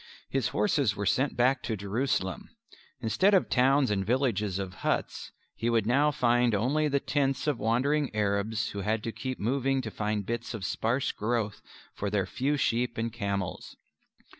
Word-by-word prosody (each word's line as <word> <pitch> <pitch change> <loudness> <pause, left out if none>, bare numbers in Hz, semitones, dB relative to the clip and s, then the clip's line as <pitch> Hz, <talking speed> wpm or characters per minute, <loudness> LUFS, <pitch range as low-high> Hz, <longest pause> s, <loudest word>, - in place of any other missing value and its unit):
His 135 -1 0
horses 145 - +1
were 100 - -3
sent 130 +7 +1
back 130 +3 +3
to 110 - -3
Jerusalem. 100 -2 -2 0.5
Instead 185 - +3
of 185 - +2
towns 135 0 +4
and 95 -2 +1
villages 105 -4 0
of 95 -2 -4
huts, - - -2 0.2
he 115 - -1
would 115 -3 +2
now 140 +6 +3
find 120 -5 +2
only 140 +9 +1
the 140 -1 +1
tents 135 -1 0
of 145 -6 0
wandering 135 +6 +1
Arabs 105 +2 0
who 100 - -6
had 105 +2 -1
to 115 - -3
keep 130 +2 -5
moving 135 +4 +1
to 110 - -5
find 105 -1 -2
bits 120 +1 -3
of 100 -4 -5
sparse 115 +6 0
growth 110 -1 -2 0.3
for 100 - -3
their 100 -2 0
few 145 +3 -1
sheep 120 -2 0
and 115 0 -2
camels. 100 -5 -3
120 Hz, 170 wpm, -29 LUFS, 105-135 Hz, 0.5 s, towns